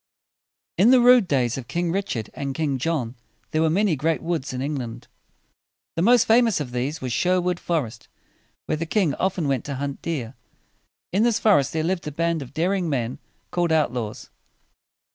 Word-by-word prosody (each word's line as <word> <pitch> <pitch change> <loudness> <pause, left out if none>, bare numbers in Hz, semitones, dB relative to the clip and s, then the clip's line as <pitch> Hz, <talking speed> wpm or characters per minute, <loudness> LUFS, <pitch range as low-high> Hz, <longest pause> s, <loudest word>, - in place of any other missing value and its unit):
In 205 +6 +6
the 255 0 +7
rude 245 -4 +6
days 125 -4 +1
of 120 - -10
King 170 +5 -1
Rich 195 -2 -2
ard 110 -2 -5
and 140 -1 -4
King 145 -4 -1
John 135 -5 -1 0.4
there 155 - +1
were 160 - +3
many 190 +1 +2
great 155 +3 -1
woods 165 -5 -2
in 130 - -4
England. 130 -4 -4 0.9
The 165 - 0
most 235 +4 +5
famous 225 -3 +4
of 135 -5 -5
these 130 +6 -3
was 125 -2 -3
Sher 185 +5 +2
wood 180 -1 -1
forest, 130 -10 -3 0.6
where - - -1
the 165 +1 -4
king 175 -5 +1
often 185 -3 -1
went 135 -3 0
to 140 - -4
hunt 140 +1 -4
deer. 135 -8 -3 0.8
In 195 - +2
this 235 -1 +3
forest 145 -11 +3
there 160 -1 -1
lived 170 -1 -2
a - - -3
band 165 +1 -1
of 130 -2 -8
daring 175 +3 0
men 125 -4 -2 0.3
called 175 -2 0
out 155 -6 +2
laws. 110 -4 -5
160 Hz, 190 wpm, -23 LUFS, 135-180 Hz, 0.9 s, the